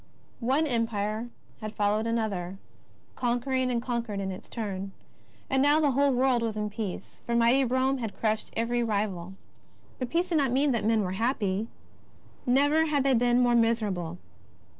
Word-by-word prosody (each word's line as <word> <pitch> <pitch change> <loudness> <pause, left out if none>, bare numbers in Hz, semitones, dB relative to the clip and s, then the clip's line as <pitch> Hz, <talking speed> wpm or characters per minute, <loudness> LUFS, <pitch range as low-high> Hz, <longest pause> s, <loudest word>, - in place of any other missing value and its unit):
One 265 +6 +2
Empire 230 -3 -1 0.3
had 215 0 -6
followed 210 +2 +1
another, 200 -5 -2 0.6
conquering 255 +1 0
and 240 -1 +1
conquered 235 -5 -2
in 195 -1 -2
its 185 - -9
turn. 195 -4 -4 0.5
And 265 -1 +2
now 290 +2 +5
the 295 -3 +3
whole 280 +2 +3
world 255 -1 +2
was 225 -2 -2
in 210 0 -2
peace, 205 -3 -6
for 235 - 0
mighty 235 +3 +4
Pome 260 +2 +1
had 225 -4 -5
crushed 215 -1 0
every 240 +1 +1
rival. 200 -5 -2 0.6
But 255 -2 -3
peace 345 +5 0
did 330 -3 +2
not 270 -4 +1
mean 275 +3 +3
that 235 -4 0
men 220 -1 +3
were 180 - -2
happy. 210 -1 0 0.8
'Never 290 +5 +4
had 290 -3 +1
they 270 -1 +3
been 245 +1 +3
more 240 0 +3
miserable. 210 -8 +1
235 Hz, 165 wpm, -28 LUFS, 210-260 Hz, 0.8 s, now